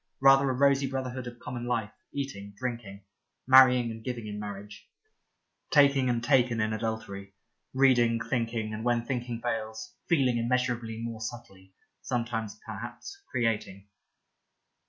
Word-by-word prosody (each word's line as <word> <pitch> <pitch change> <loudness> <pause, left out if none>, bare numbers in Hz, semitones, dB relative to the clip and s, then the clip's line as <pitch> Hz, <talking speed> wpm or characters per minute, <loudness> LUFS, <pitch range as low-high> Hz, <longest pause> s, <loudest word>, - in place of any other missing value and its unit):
Rather 135 0 +6
a - - +1
rosy 140 +1 +3
Brotherhood 130 -1 -4
of 120 0 -8
,Common 120 0 -6
Life, 115 -3 -1 0.2
eating, 100 -8 -5
drinking; 115 -6 -5 0.4
marrying 125 -2 +7
and 110 0 -9
giving 120 -3 -4
in 105 -1 -5
marriage; 105 0 -8 0.8
taking 140 -3 +4
and 120 -1 0
taken 125 -3 +3
in 110 0 0
adultery; 110 -3 -5 0.4
reading, 120 -3 +4
thinking, 115 -2 -2
and 110 +1 -5
when 120 -1 +1
thinking 120 -2 -3
fails, 110 -2 -4 0.2
feeling 135 -8 +3
immeasurably 120 -2 -1
more 115 -1 -5
subtly, 95 -5 -9 0.3
sometimes 115 -3 -3
perhaps 395 0 -8
creating. 105 -4 -2
120 Hz, 130 wpm, -28 LUFS, 110-125 Hz, 0.8 s, marrying